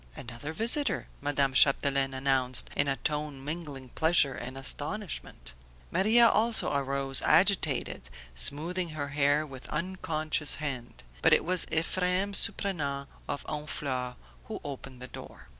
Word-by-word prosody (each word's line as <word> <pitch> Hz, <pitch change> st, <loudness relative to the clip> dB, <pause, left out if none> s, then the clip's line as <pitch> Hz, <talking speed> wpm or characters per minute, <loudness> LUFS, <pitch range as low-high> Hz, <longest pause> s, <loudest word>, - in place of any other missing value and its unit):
"Another 120 Hz, +5 st, -7 dB
visitor!" 235 Hz, -, 0 dB, 0.2 s
Madame 140 Hz, -2 st, +1 dB
Chapdelaine 135 Hz, 0 st, +3 dB
announced 130 Hz, -1 st, 0 dB
in 140 Hz, -, +1 dB
a 135 Hz, -, 0 dB
tone 150 Hz, -2 st, -4 dB
mingling 145 Hz, -5 st, -6 dB
pleasure 160 Hz, -1 st, +2 dB
and 130 Hz, +2 st, -7 dB
astonishment. 145 Hz, -, -3 dB, 0.4 s
Maria 230 Hz, +4 st, +5 dB
also 225 Hz, -6 st, +2 dB
arose, 135 Hz, -1 st, +3 dB
agitated, 165 Hz, -6 st, +2 dB, 0.2 s
smoothing 165 Hz, -, +2 dB
her 145 Hz, -1 st, -4 dB
hair 145 Hz, +1 st, +1 dB
with 135 Hz, -3 st, -11 dB
unconscious 155 Hz, -3 st, -1 dB
hand; 130 Hz, -, -6 dB, 0.2 s
but -, -, +4 dB
it -, -, +3 dB
was 180 Hz, +1 st, +5 dB
Ephrem 180 Hz, +4 st, 0 dB
Surprenant 145 Hz, -9 st, 0 dB, 0.2 s
of 140 Hz, -, -4 dB
Honfleur 135 Hz, -4 st, -3 dB, 0.3 s
who -, -, -7 dB
opened 135 Hz, -3 st, -9 dB
the -, -, -7 dB
door. -, -, -12 dB
145 Hz, 125 wpm, -28 LUFS, 135-170 Hz, 0.4 s, Maria